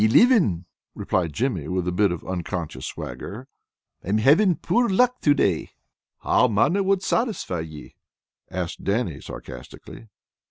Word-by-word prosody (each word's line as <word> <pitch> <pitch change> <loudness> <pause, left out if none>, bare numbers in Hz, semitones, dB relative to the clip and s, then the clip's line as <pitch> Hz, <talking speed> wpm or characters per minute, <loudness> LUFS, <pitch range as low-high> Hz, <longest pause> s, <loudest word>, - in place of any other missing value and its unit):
"Elivin," 110 - +4 0.3
replied 90 -4 -1
Jimmy, 95 - -2
with 90 0 -2
a - - +1
bit 100 +1 +2
of 90 - -5
unconscious 85 -7 -4
swagger. 120 +7 -7 0.6
"I - - -7
am 105 - +2
havin' 160 - +4
poor 240 +7 +1
luck 250 +6 +2
to 145 -1 +4
day." 95 - 0 0.5
"How 125 - +3
mony 135 - +2
wad 195 0 +1
satisfy 220 - -1
ye?" 80 -2 -9 0.5
asked 90 -1 -5
Dannie 100 - -1
sarcastically. 115 - -10
105 Hz, 135 wpm, -24 LUFS, -, 0.6 s, Elivin